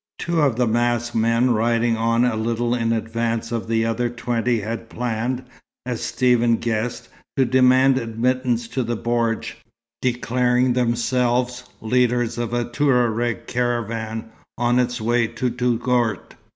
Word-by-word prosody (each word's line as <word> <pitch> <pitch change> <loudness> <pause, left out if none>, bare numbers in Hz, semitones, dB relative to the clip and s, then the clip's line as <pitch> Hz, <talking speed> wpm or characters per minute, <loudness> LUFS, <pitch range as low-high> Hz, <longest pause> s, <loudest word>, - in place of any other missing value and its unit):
Two 170 -1 0
of 140 -6 +2
the 125 +1 +2
masked 120 +1 0
men 115 +2 +2
riding 115 +1 +2
on 115 +2 +2
a 120 -2 +1
little 115 +2 -1
in 115 -2 0
advance 115 0 -2
of 115 -1 -3
the 115 0 +1
other 115 +1 0
twenty 120 0 -1
had 115 +2 -5
planned, 120 +2 -2 0.4
as 125 -2 -3
Stephen 120 -2 +2
guessed, 115 +1 -3 0.3
to 135 - +4
demand 130 +1 +4
admittance 120 +1 -1
to 130 - -2
the 120 -1 -2
bordj, 115 -1 -1 0.5
declaring 125 0 +1
themselves 125 +1 0 0.2
leaders 120 0 +1
of 120 -1 -2
a 120 0 0
Touareg 120 -3 +1
caravan 115 -2 -2 0.3
on 120 +1 +2
its 125 -1 0
way 120 +1 +1
to 125 +2 -2
Touggourt. 120 -3 0
120 Hz, 140 wpm, -22 LUFS, 115-125 Hz, 0.5 s, to